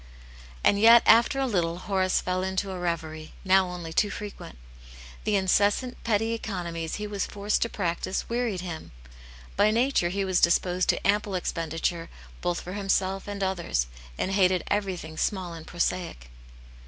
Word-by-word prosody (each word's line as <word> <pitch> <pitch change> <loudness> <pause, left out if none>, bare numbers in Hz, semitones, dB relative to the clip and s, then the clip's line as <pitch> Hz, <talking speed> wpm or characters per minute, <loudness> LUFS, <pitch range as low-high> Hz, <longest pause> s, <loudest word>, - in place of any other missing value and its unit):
And 200 - +4
yet, 230 +2 +8
after 235 +4 +5
a 270 - +1
little, 175 -8 0
Horace 185 0 0
fell 185 0 -1
into 190 +1 -2
a 185 - -5
reverie, 160 -3 -4
now 190 -1 +4
only 175 -2 -6
too 205 +5 +2
frequent. 205 - -8 0.7
The 210 - +2
incessant 205 +6 +1
petty 225 0 +1
econo 180 -6 -4
mies 165 -1 -3
he 210 - -4
was 205 -2 -3
forced 205 +1 -1
to 230 - +1
practise 185 -1 -2
wearied 235 -6 -1
him; 170 - -7 0.6
by 210 - +4
nature 230 -5 +2
he 195 +2 -1
was 185 -2 +1
disposed 180 +1 +2
to - - +1
ample 205 -1 +1
expenditure 165 -1 -2 0.3
both 175 -1 -1
for 180 - -7
himself 195 -1 -1
and 200 -1 -4
others, 175 - 0 0.3
and 190 - -1
hated 185 -3 +3
everything 185 -6 -2
small 185 -2 -1
and 165 -1 -10
prosaic. 170 - -3
185 Hz, 160 wpm, -27 LUFS, 175-205 Hz, 0.7 s, yet